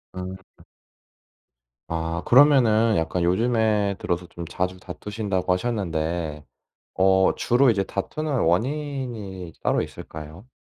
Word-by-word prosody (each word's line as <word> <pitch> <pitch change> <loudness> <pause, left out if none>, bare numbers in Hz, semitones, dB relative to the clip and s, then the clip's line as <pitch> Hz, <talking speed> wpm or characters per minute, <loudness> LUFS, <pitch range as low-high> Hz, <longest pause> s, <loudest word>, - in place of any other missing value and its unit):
음. 90 0 -5 0.3
으. - - -17 1.2
아. 85 +1 -2
그러면은 120 -5 +5
약간 80 +2 -1
요즘에 105 +1 +2
들어서 90 0 -2
좀 85 0 -8
자주 90 +2 -3
다투신다고 95 0 -2
하셨는데 85 -7 -2 0.5
어 95 0 +4
주로 125 +2 +3
이제 100 -4 +2
다투는 150 +11 -4
원인이 115 - -2
따로 - - +2
있을까요? 80 +9 -9
95 Hz, 250 characters per minute, -24 LUFS, 85-115 Hz, 1.2 s, 그러면은